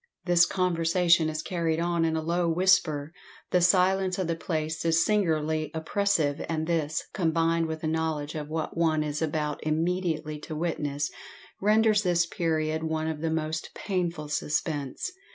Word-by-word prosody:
This 175 Hz, -1 st, +5 dB
conversation 170 Hz, -2 st, +2 dB
is 155 Hz, 0 st, -4 dB
carried 165 Hz, -3 st, -1 dB
on 170 Hz, -1 st, +1 dB
in 160 Hz, -1 st, 0 dB
a 160 Hz, -, -2 dB
low 170 Hz, +1 st, 0 dB
whisper; 165 Hz, -4 st, +2 dB, 0.4 s
the 180 Hz, -, +3 dB
silence 185 Hz, +1 st, +3 dB
of 190 Hz, -, -1 dB
the 165 Hz, 0 st, -1 dB
place 160 Hz, -1 st, -3 dB
is 165 Hz, 0 st, +3 dB
singularly 160 Hz, -6 st, +1 dB
oppressive; 160 Hz, -3 st, 0 dB
and 160 Hz, -1 st, -1 dB
this, 160 Hz, -2 st, -1 dB
combined 165 Hz, -2 st, +1 dB
with 160 Hz, 0 st, -5 dB
the 160 Hz, -, -2 dB
knowledge 155 Hz, -2 st, -1 dB
of 150 Hz, -1 st, -5 dB
what 160 Hz, 0 st, -3 dB
one 160 Hz, -2 st, +2 dB
is 150 Hz, +1 st, -3 dB
about 150 Hz, -2 st, -2 dB
immediately 160 Hz, -1 st, -1 dB
to 155 Hz, +1 st, -7 dB
witness, 150 Hz, -3 st, -2 dB, 0.5 s
renders 215 Hz, +1 st, +4 dB
this 175 Hz, -3 st, +2 dB
period 160 Hz, -3 st, -1 dB
one 160 Hz, 0 st, -2 dB
of 155 Hz, -2 st, -3 dB
the 165 Hz, -, 0 dB
most 160 Hz, 0 st, -3 dB
painful 175 Hz, -5 st, -2 dB
suspense. 150 Hz, -, -2 dB
160 Hz, 155 wpm, -27 LUFS, 155-175 Hz, 0.5 s, This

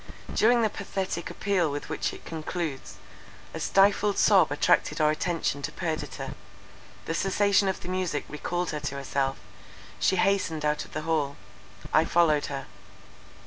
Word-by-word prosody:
During 235 Hz, +1 st, +4 dB
the 220 Hz, -, +3 dB
pathetic 190 Hz, -4 st, -4 dB
appeal 185 Hz, -5 st, 0 dB
with 145 Hz, 0 st, -4 dB
which -, -, -2 dB
it -, -, -12 dB
concludes, 160 Hz, -3 st, -4 dB, 0.6 s
a -, -, -5 dB
stifled 200 Hz, +1 st, +3 dB
sob 190 Hz, -8 st, +5 dB
attracted 150 Hz, +1 st, +2 dB
our 150 Hz, 0 st, +4 dB
attention 155 Hz, -3 st, -1 dB
to 150 Hz, -, -3 dB
Perdita, 160 Hz, -1 st, -4 dB, 0.7 s
the -, -, -2 dB
cessation 195 Hz, +2 st, +2 dB
of 190 Hz, -, -1 dB
the -, -, -8 dB
music 185 Hz, -5 st, -2 dB
recalled 175 Hz, +4 st, -3 dB
her 150 Hz, -, -3 dB
to 145 Hz, -1 st, -4 dB
herself, 135 Hz, 0 st, -1 dB, 0.6 s
she 190 Hz, -, +3 dB
hastened 180 Hz, -5 st, +1 dB
out 150 Hz, 0 st, 0 dB
of -, -, -17 dB
the 155 Hz, -, -3 dB
hall—I 140 Hz, -6 st, -2 dB
followed 160 Hz, -4 st, +3 dB
her. 135 Hz, -1 st, -5 dB
165 Hz, 145 wpm, -27 LUFS, 150-190 Hz, 0.7 s, sob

